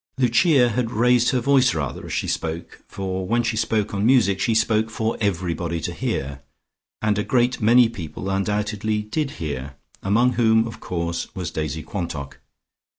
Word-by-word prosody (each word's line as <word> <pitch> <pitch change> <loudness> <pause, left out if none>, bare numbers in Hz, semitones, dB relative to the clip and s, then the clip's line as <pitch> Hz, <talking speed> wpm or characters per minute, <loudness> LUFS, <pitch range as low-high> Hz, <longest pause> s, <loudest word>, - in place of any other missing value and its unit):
Lucia 130 +1 +4
had 120 0 -1
raised 120 +1 +3
her 130 - +1
voice 130 -5 +3
rather 70 -5 -3
as - - -8
she - - -1
spoke, 80 +1 -4
for 95 -1 -4
when 120 +3 +1
she 115 -1 -1
spoke 110 -1 0
on 100 0 -1
music 110 -6 +4
she 115 - +1
spoke 110 0 +2
for 110 +1 -2
everybody 85 -4 -1
to - - -4
hear. 70 0 -3 0.6
And 105 -1 +2
a - - 0
great 125 +1 +1
many 120 +2 +6
people 95 -4 -7
undoubtedly 105 +2 -1
did 140 +7 -2
hear, 70 -4 -5 0.3
among 120 +6 +2
whom, 110 -1 +3
of 115 - -9
course, 85 -1 -3
was 90 -3 -4
Daisy 80 0 -3
Quantock. 75 -8 -5
105 Hz, 165 wpm, -23 LUFS, 85-115 Hz, 0.6 s, many